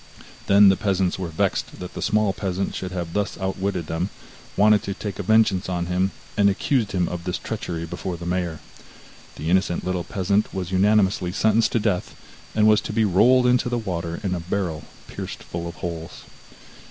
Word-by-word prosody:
Then 100 0 +7
the 95 - +4
peasants 95 -3 0
were 90 - -2
vexed 80 -1 -1
that 90 - -7
the - - -6
small 105 -2 +2
peasant 95 0 -2
should 95 -1 -5
have 85 -2 -4
thus 105 -2 -1
outwitted 95 -2 -2
them, 80 +5 -2 0.5
wanted 105 0 +5
to 100 -3 -4
take 100 -3 -5
vengeance 100 -2 +2
on 90 -1 -1
him, 90 +2 +1 0.3
and 100 -1 +4
accused 110 +2 0
him 90 -2 +1
of 90 -1 -5
this 90 0 -2
treachery 85 -1 -4
before 85 +2 -5
the 85 - -8
mayor. 85 -2 -2 0.7
The 80 +3 -3
innocent 95 -2 +1
little 90 -1 -1
peasant 100 +2 0
was 95 -1 -3
unanimously 95 -2 +3
sentenced 110 +3 +2
to 115 - +3
death, 100 -4 -1 0.4
and 110 -1 +4
was 110 -1 +5
to - - -5
be 110 0 +3
rolled 125 +7 +5
into 125 0 +3
the 120 - 0
water, 85 -6 -3
in 95 -2 0
a 90 - -2
barrel 85 -2 -3 0.2
pierced - - -7
full 85 0 -5
of 85 - -7
holes. 85 -2 -6
95 Hz, 190 wpm, -23 LUFS, 90-105 Hz, 0.7 s, Then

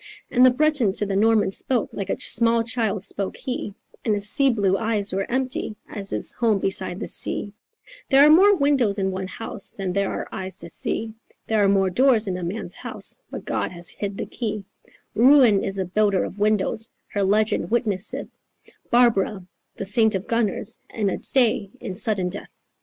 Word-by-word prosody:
And 250 - +4
the 255 - +9
Breton 265 -5 +2
to 210 - -1
the 195 -1 -2
Norman 215 -1 +3
spoke, 245 +4 -1
like 195 -1 -5
a - - -2
small 230 0 +2
child 220 -4 -2
spoke 200 -1 -3
he, 250 -6 -4 0.3
And 215 - +1
his 205 0 -2
sea 275 +4 +3
blue 200 -6 +1
eyes 210 -2 -1
were 195 +1 -2
empty 260 -2 -2
as 200 -2 -4
his - - -1
home 225 -4 +1
beside 190 -1 0
the - - -4
sea: 205 - -1 0.6
"There 275 +1 +7
are 300 - +7
more 400 +6 +7
windows 275 - +2
in 190 -1 0
one 190 0 -4
house 225 +2 -7
than 190 -2 -4
there 200 0 0
are - - -4
eyes 190 0 -5
to 170 - -6
see, 220 +6 -3 0.3
There 220 -2 +1
are 195 - +4
more 195 -1 +2
doors 235 +1 +3
in 185 - -1
a 180 - -5
man's 180 +6 -4
house, - - -4
but - - -8
God - - -2
has 175 -1 -3
hid 200 -1 -5
the - - -3
key: 215 -4 -4 0.5
Ruin 245 -4 +5
is 195 - -2
a 190 - -1
builder 200 +1 +1
of 200 - -7
windows; 215 +2 0 0.2
her 205 - -2
legend 210 +3 +1
witnesseth 215 -4 -1 0.6
Barbara, 220 -5 +2 0.3
the 195 - -5
saint 220 +2 +2
of 190 - -4
gunners, 230 -4 -1
and 205 -4 -1
a - - -4
stay 235 -6 +1
in 190 - -6
sudden 200 -2 -1
death." 200 +3 -7
210 Hz, 190 wpm, -23 LUFS, 195-235 Hz, 0.6 s, the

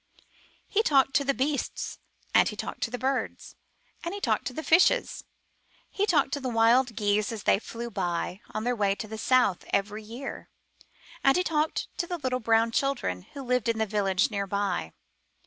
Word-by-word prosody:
He 425 - +2
talked 270 -9 +3
to 285 - 0
the 275 - +2
beasts, 280 +2 -2 0.3
and - - +5
he - - -6
talked - - -6
to - - 0
the 245 - -4
birds, 265 +2 -2 0.5
and 345 +3 -3
he - - -5
talked - - 0
to - - -3
the 315 - -5
fishes. 365 +11 +3 0.7
He 410 +1 0
talked - - +3
to 285 - -1
the 260 -2 -3
wild 235 +1 +3
geese 205 0 +1
as 220 -2 -6
they - - +4
flew 235 +2 -7
by 180 0 -2
on 215 0 -4
their 245 +1 0
way 200 -3 +1
to 215 - -6
the 220 0 -7
south 255 -8 +3
every 210 +2 -1
year, 235 +6 -8 0.7
and 270 +3 +5
he 360 - +2
talked 310 -1 0
to 345 - 0
the 350 - -3
little 255 -4 -1
brown 230 0 +3
children 245 - -1
who 280 - -6
lived 250 -2 0
in 230 - +1
the 220 - +1
village 200 -1 +1
near 200 -1 -2
by. 195 - -1
235 Hz, 195 wpm, -27 LUFS, 210-275 Hz, 0.7 s, and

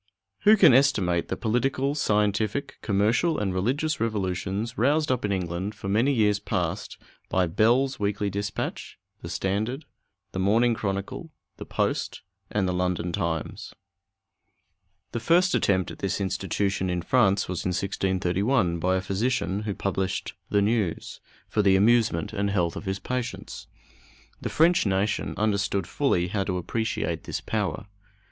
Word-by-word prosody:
Who 215 +1 +8
can 170 -9 +7
estimate 100 -11 +3
the - - -3
political, 130 +4 0
scientific, 110 +2 0
commercial, 115 - +2
and 100 -3 -1
religious 135 +11 0
revolutions 105 +1 -2
roused 145 +5 +2
up 125 - 0
in 105 - 0
England 95 +2 -2
for 95 -1 -6
many 115 +8 +3
years 105 -5 +2
past - - -3 0.3
by 95 -1 +2
Bell's 120 +10 +2
Weekly 100 0 -1
Dispatch, 100 0 -4 0.2
the - - -7
Standard, 110 +10 -2 0.5
the 95 - -4
Morning 115 +5 +3
Chronicle, 100 - -4 0.3
the - - -8
Post, - - -2 0.3
and 100 -3 0
the 90 - 0
London 90 -1 -1
Times? 85 -4 -3 1.4
The 120 - -2
first 175 +9 +3
attempt 95 -2 +1
at - - -11
this 95 0 -1
institution 95 0 -1
in 90 -1 -2
France 100 -2 +3
was 90 -2 -3
in - - -1
1631, 95 +1 0
by 90 +3 +1
a 95 - 0
physician, 100 -1 -1
who 100 - -2
published 95 -1 -2 0.2
the 100 -1 +3
News, 105 -5 -1 0.3
for 105 - +1
the 100 -2 +4
amusement 110 -4 +3
and 100 -1 0
health 90 -4 0
of - - -7
his 95 0 -1
patients. 125 +2 -5 0.7
The - - -3
French 170 +2 +4
nation 100 +2 0
understood 100 -3 0
fully 90 - 0
how 100 +1 0
to 90 -2 -1
appreciate 110 +5 -2
this - - -3
power. - - -2
100 Hz, 145 wpm, -26 LUFS, 95-120 Hz, 1.4 s, Who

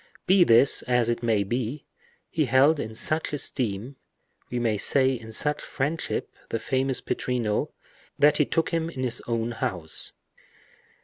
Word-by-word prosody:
Be 185 0 +5
this 125 -1 +5
as 125 -2 +2
it 120 - -3
may, 110 -4 +1 0.8
he 155 -2 0
held 135 +5 +4
in 110 -4 -5
such 155 +6 -1
esteem, 125 -2 -3 0.5
we 125 - -3
may 115 -3 +1
say 130 +5 +3
in 115 -3 -6
such 150 +6 0
friendship, 150 +5 -3 0.2
the - - -1
famous 130 +3 -1
Pittrino, 120 -4 -1 0.5
that 150 +1 +4
he 150 - +3
took 165 - 0
him 165 -1 -1
in 130 -6 -5
his 120 -1 -1
own 115 0 -1
house. 90 -8 -1
125 Hz, 145 wpm, -26 LUFS, 115-145 Hz, 0.8 s, Be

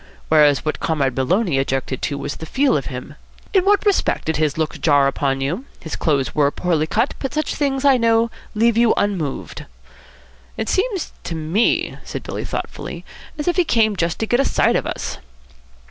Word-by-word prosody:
"Whereas 150 -3 +4
what 155 - -2
Comrade 140 -5 0
Maloney 165 - +1
objected 135 -1 -2
to 140 - -2
was 140 0 -5
the 160 - -8
feel 270 - +2
of - - -1
him. - - -7 0.4
In 380 -2 +3
what 405 +1 +3
respect 405 -2 +1
did 160 - 0
his 155 -2 0
look 160 -1 -2
jar 145 -3 +4
upon 135 -1 0
you? 175 - -2
His 160 - -6
clothes 140 -4 0
were 145 -2 +3
poorly 160 -1 0
cut, 225 - +1
but 270 +1 -4
such 305 0 -1
things, 275 -1 -1
I 275 -2 +6
know, 230 -1 +2 0.2
leave 230 +1 +3
you 235 -1 +4
unmoved." 175 -9 -2 0.9
"It 220 - -2
seems 390 -2 0
to 165 - -4
me," 160 +8 0
said - - -6
Billy - - -5
thoughtfully, - - -6 0.3
"as 295 - -4
if 350 - +1
he 360 - +5
came 220 -8 +2
just 170 -2 -1
to 220 - -1
get 240 +3 +1
a - - +4
sight - - +2
of - - 0
us." - - -4
180 Hz, 190 wpm, -20 LUFS, -, 0.9 s, I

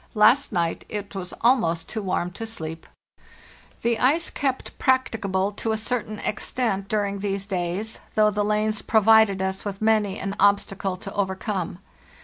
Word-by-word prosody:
Last 220 +6 +5
night 170 -2 -1
it 205 -1 -5
was 185 -2 -5
almost 170 -10 +2
too 220 - -3
warm 180 -2 -1
to 225 +5 -6
sleep." 165 -7 -5 1.0
The 235 -1 +1
ice 305 +7 +2
kept 265 -2 -2
practicable 210 -7 +1
to 220 +2 -2
a - - 0
certain 220 -1 -3
extent 210 -1 -2
during 200 -2 -1
these 195 -1 -2
days, 190 +3 -2 0.2
though 215 -1 +4
the 205 0 0
lanes 215 0 +1
provided 220 -3 +4
us 190 0 -2
with 200 -1 -5
many 215 -2 +2
an 195 +1 -3
obstacle 195 -1 +2
to 195 +1 -8
overcome. 190 -2 -2
205 Hz, 150 wpm, -24 LUFS, 190-220 Hz, 1.0 s, Last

